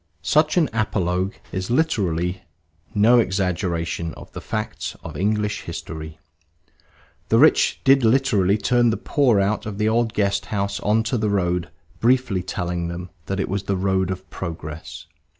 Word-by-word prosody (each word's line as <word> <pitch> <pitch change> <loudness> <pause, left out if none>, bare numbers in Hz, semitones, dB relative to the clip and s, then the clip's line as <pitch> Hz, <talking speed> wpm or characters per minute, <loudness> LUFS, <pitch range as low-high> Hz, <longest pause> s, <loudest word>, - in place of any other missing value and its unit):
Such 155 - +2
an 165 -4 +4
apologue 95 -4 0 0.2
is 95 0 -3
literally 95 - 0 0.5
no 115 +4 +6
exaggeration 90 -5 -1
of - - -12
the - - -7
facts - - -4
of - - -8
English 105 +1 0
history. 80 0 -7 1.1
The - - +4
rich - - +4
did 135 -1 +5
literally 110 -5 +3
turn 120 +2 +3
the 115 - 0
poor 125 -8 +2
out 105 +2 0
of 100 -2 -5
the 105 0 +1
old 115 0 +1
guest 100 -1 0
house 100 -1 -2
on 105 +3 +2
to 115 +1 -1
the 105 -1 0
road, 90 -3 0 0.3
briefly 120 -4 +2
telling 90 -1 -3
them 85 +1 -6 0.2
that 100 0 -2
it 95 - 0
was 100 +1 -3
the 100 -1 0
road 95 -1 +1
of 95 0 -5
progress. 80 -2 -7
100 Hz, 155 wpm, -22 LUFS, 90-110 Hz, 1.1 s, no